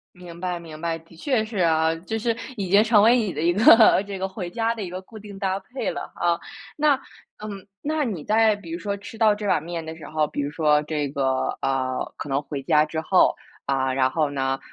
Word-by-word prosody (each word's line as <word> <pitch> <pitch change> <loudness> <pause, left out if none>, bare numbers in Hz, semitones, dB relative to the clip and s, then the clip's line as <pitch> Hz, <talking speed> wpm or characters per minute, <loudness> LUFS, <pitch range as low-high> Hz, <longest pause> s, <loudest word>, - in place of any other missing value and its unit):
明 175 -1 -11
白 180 -1 -2
明 160 -2 -10
白， 165 0 -2
的 165 - -21
确 245 - 0
是 220 -1 -7
啊。 160 -2 +3
就 180 +7 -4
是 230 +1 0 0.2
已 195 -5 -4
经 200 +3 +6
成 220 -2 +5
为 235 +3 +6
你 215 -7 -1
的 150 - -4
一 170 +2 +3
个 220 +2 +7
这 200 -1 -5
个 190 0 -2
回 190 -2 -6
家 230 +3 0
的 225 - -7
一 185 - -4
个 185 +1 -6
固 215 +3 -13
定 205 -1 -10
搭 195 0 -1
配 255 +6 -4
了 - - -5
啊。 170 -1 +1 0.4
那 300 -1 +4 0.5
嗯， 200 -2 -7
那 305 0 -1
你 190 -11 -4
在 220 +2 +3
比 200 -5 -11
如 170 - -4
说 200 +2 -3
吃 205 +3 -10
到 220 -2 +4
这 210 0 -6
碗 195 - +2
面 165 0 -5
的 160 0 -7
时 160 - -11
候， 155 0 0
比 145 - -4
如 140 - -2
说 150 -1 +3
这 150 -2 -2
个， 135 -1 -1
呃， 130 -1 -1
可 - - -6
能 135 +1 0
回 145 -2 -6
家 150 +1 +4
之 160 +1 -4
后， 185 +3 +3 0.3
啊， 135 -1 0
然 130 0 +2
后 155 +1 0
呢， 135 -1 -1
175 Hz, 255 characters per minute, -24 LUFS, 155-210 Hz, 0.5 s, 个